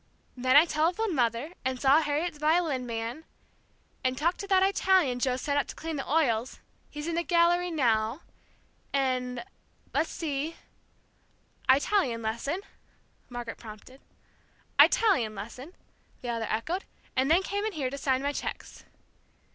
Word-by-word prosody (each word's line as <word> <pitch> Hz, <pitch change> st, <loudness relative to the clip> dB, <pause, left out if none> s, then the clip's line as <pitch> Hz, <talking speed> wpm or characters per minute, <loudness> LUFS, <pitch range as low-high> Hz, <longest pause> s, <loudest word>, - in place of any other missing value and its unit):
then 255 Hz, +1 st, +2 dB
I 300 Hz, +3 st, +9 dB
telephoned 345 Hz, +5 st, 0 dB
mother, 240 Hz, +5 st, 0 dB
and 260 Hz, -1 st, -2 dB
saw 280 Hz, +4 st, +5 dB
Harriet's 300 Hz, +2 st, -2 dB
violin 305 Hz, -5 st, +1 dB
man, 230 Hz, +6 st, -4 dB, 0.8 s
and 255 Hz, 0 st, 0 dB
talked 340 Hz, +5 st, 0 dB
to 400 Hz, -, -5 dB
that 380 Hz, -1 st, +4 dB
Italian 370 Hz, -10 st, +2 dB
Joe 250 Hz, 0 st, +1 dB
sent 285 Hz, +2 st, 0 dB
up -, -, -1 dB
to -, -, -8 dB
clean 325 Hz, 0 st, -5 dB
the 270 Hz, -, -5 dB
oils, 255 Hz, -6 st, +1 dB, 0.3 s
he's 295 Hz, 0 st, -6 dB
in 335 Hz, -, -2 dB
the 340 Hz, -, +1 dB
gallery 345 Hz, +1 st, +3 dB
now, 235 Hz, -3 st, +1 dB, 0.7 s
and 255 Hz, -1 st, -1 dB, 0.5 s
let's 320 Hz, -, +1 dB
see 310 Hz, 0 st, -3 dB, 0.6 s
" -, -, -33 dB
"Italian 265 Hz, -, +3 dB
lesson," 235 Hz, -, -2 dB, 0.7 s
Margaret 240 Hz, -2 st, -6 dB
prompted. 225 Hz, +4 st, -12 dB, 0.8 s
"Italian 255 Hz, -, +5 dB
lesson," 250 Hz, -, -8 dB, 0.5 s
the 245 Hz, -, -5 dB
other 230 Hz, -2 st, -2 dB
echoed, 325 Hz, -, -2 dB, 0.3 s
"and 260 Hz, +2 st, +2 dB
then 345 Hz, +4 st, +4 dB
came 405 Hz, +1 st, -2 dB
in 435 Hz, -1 st, -2 dB
here 270 Hz, -6 st, -2 dB
to 280 Hz, -, -5 dB
sign 265 Hz, -1 st, +1 dB
my 285 Hz, 0 st, 0 dB
cheques." -, -, -6 dB
280 Hz, 145 wpm, -28 LUFS, 250-335 Hz, 0.8 s, I